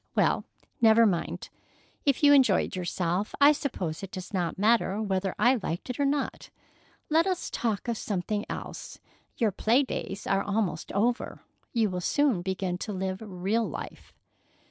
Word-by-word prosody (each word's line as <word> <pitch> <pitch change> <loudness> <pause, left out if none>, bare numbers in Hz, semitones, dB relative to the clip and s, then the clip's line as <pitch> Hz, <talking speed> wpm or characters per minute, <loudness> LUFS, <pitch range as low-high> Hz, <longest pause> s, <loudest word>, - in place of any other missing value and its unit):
"Well, - - +2 0.4
never 225 0 +6
mind. 185 -6 -1 0.6
If 280 0 +2
you 290 0 +8
enjoyed 255 -12 +4
yourself, 180 +2 -2
I 285 +1 +8
suppose 190 - -3
it 195 - -6
does 185 +2 -8
not 175 -3 -1
matter 210 -1 +2
whether 195 -3 -1
I 245 +3 +4
liked 175 +8 -3
it 250 - -8
or 285 - +3
not. 285 0 -2 0.6
Let 325 +4 +4
us 370 -2 -2
talk 225 -3 -2
of 235 -2 -1
something 205 +1 -2
else. - - -7 0.4
Your 225 -4 +2
play 235 +8 +3
days 205 -6 -5
are 195 0 +2
almost 200 -6 -2
over. 235 +5 -1 0.3
You 225 -5 +1
will 180 0 -3
soon 270 -2 +2
begin 185 -1 -2
to 215 - -4
live 190 +1 -3
real 205 +3 -1
life." - - -8
210 Hz, 160 wpm, -28 LUFS, 185-240 Hz, 0.6 s, you